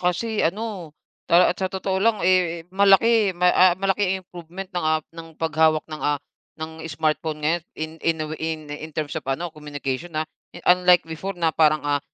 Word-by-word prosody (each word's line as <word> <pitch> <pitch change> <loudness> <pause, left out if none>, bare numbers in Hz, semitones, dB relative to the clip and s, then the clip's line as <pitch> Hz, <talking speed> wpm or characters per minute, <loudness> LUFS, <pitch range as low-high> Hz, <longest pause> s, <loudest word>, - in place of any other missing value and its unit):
kasi 210 +5 0
ano, 185 -4 -3 0.3
ta 175 +1 +5
at 180 - -14
sa 190 - 0
totoo 190 0 -2
lang, 225 +1 +3
eh, 175 -3 +2
malaki 200 0 +4
ma 180 0 +4
ah, 180 -1 +5
malaking 195 0 +1
improvement 175 +2 -9
ng, 175 - -1
ah, 155 -1 +1
ng 165 -1 -11
paghawak 160 -1 +2
ng, 155 - -6
ah, 145 0 +1 0.4
ng 160 0 -7
smart 155 0 0
phone 155 -2 -5
ngayon 165 +2 +1
in 155 0 -4
in 165 -1 +1
a - - -5
way, - - -7
in 160 -1 -2
in 155 +2 -7
terms 150 -2 -2
of 160 - -3
ano, 165 +5 -2
communication, 150 +1 -5
ha. 155 - 0 0.3
Eh, 175 - -12
unlike 180 0 +5
before 175 +4 -6
na 165 -2 +1
parang, 155 -2 +3
ah, 145 -1 +1
165 Hz, 200 wpm, -23 LUFS, 155-185 Hz, 0.4 s, ta